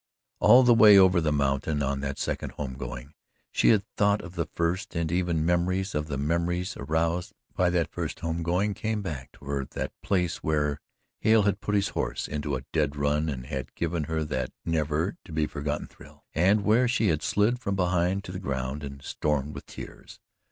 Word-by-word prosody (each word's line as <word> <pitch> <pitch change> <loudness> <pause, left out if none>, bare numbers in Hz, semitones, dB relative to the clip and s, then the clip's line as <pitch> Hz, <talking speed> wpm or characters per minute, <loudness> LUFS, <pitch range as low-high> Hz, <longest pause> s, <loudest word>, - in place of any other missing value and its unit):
All 120 +5 +7
the 120 -1 +6
way 105 -3 +8
over 95 -2 +6
the 80 -1 +1
mountain, 70 +1 0
on 70 0 -1
that 70 0 -3
second - - -3
home 70 -3 -5
going, 70 +2 -7 0.4
she - - +3
had 105 -3 +4
thought 100 0 +3
of 85 0 -9
the 85 -3 -2
first, 85 +6 -2
and 85 -1 -1
even 85 -3 0
memories 90 +3 +1
of 75 0 -2
the 70 -3 -3
memories 85 +6 -1
aroused 80 +4 -1 0.2
by 90 -1 +3
that 85 -3 0
first - - -4
home 85 0 -2
going 90 +5 +1
came 110 0 -2
back 75 -8 -6
to - - -16
her 70 -1 -1
the - - -5
place 90 -4 0
where 75 -2 -1 0.4
Hale 110 -1 +4
had 100 0 0
put 105 - -1
his 100 -1 +2
horse - - -2
into 75 -1 -2
a 65 - -6
dead 75 -3 +1
run 75 +2 +1
and 65 -3 -5
had 65 -3 -5
given 85 -2 -1
her 80 +1 -1
that 65 -4 -2 0.2
never 80 +3 0
to 95 - -13
be 80 -1 +1
forgotten 75 0 -3
thrill, - - -17
and 100 +5 +3
where 115 +4 +4
she 115 -3 +2
had 75 -2 +1
slid 110 +4 +1
from 100 -5 -2
behind 90 +1 +1
to 90 - -7
the 90 - -5
ground 70 -3 -3
and 70 0 -8
stormed 75 0 -1
with - - -9
tears. - - -10
85 Hz, 200 wpm, -27 LUFS, 75-95 Hz, 0.4 s, way